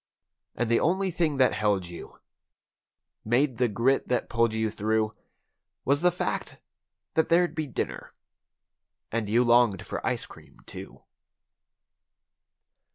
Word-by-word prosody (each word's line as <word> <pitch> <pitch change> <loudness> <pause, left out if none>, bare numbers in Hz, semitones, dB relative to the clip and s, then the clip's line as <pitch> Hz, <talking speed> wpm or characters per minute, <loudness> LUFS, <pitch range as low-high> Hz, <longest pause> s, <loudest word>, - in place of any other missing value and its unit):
And 120 - -1
the 115 0 +3
only 190 +3 +1
thing 160 -4 0
that 130 -1 +4
held 105 -3 +1
you—made 120 - -5
the 125 - +4
grit 120 +6 +1
that 125 - -1
pulled 115 0 +2
you 110 -1 0
through. 110 +1 0 0.7
Was 140 +2 +2
the 180 0 +4
fact 175 - -3 0.6
that 160 0 +2
there'd 175 +1 +3
be 155 -2 -3
dinner, - - -5 1.0
and 115 -2 -2
you 120 +3 +4
longed 120 -5 +3
for - - -5
ice - - -1
cream, - - -16
too. - - -10
120 Hz, 125 wpm, -27 LUFS, 110-150 Hz, 1.0 s, that